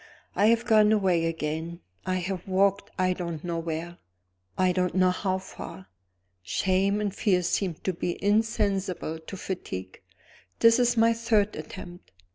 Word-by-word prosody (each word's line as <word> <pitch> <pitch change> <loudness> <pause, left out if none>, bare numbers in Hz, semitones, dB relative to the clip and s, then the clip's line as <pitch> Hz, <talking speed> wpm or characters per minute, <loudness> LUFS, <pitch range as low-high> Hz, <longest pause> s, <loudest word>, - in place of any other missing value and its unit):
I 205 - +4
have 230 +1 +3
gone 215 -2 +5
away 185 -6 +2
again 160 +1 -3 0.3
I 185 - +1
have 185 0 -3
walked, 200 +1 +2
I 185 -1 +2
don't 170 -3 -5
know 170 -1 -2
where, 165 +1 -5 0.6
I 185 0 +3
don't 180 -1 0
know 185 -1 +4
how 185 0 -1
far. 100 - -10 0.5
Shame 190 - +1
and 205 -2 -1
fear 185 -3 +2
seemed 175 -1 -1
to 190 - 0
be 175 0 -3
insensible 200 -6 0
to 160 +5 -9
fatigue. 95 - -6 0.6
This 230 +1 +5
is 240 -1 +2
my 230 +1 +5
third 220 -3 +1
attempt. 175 -2 -9
185 Hz, 150 wpm, -27 LUFS, 170-205 Hz, 0.6 s, gone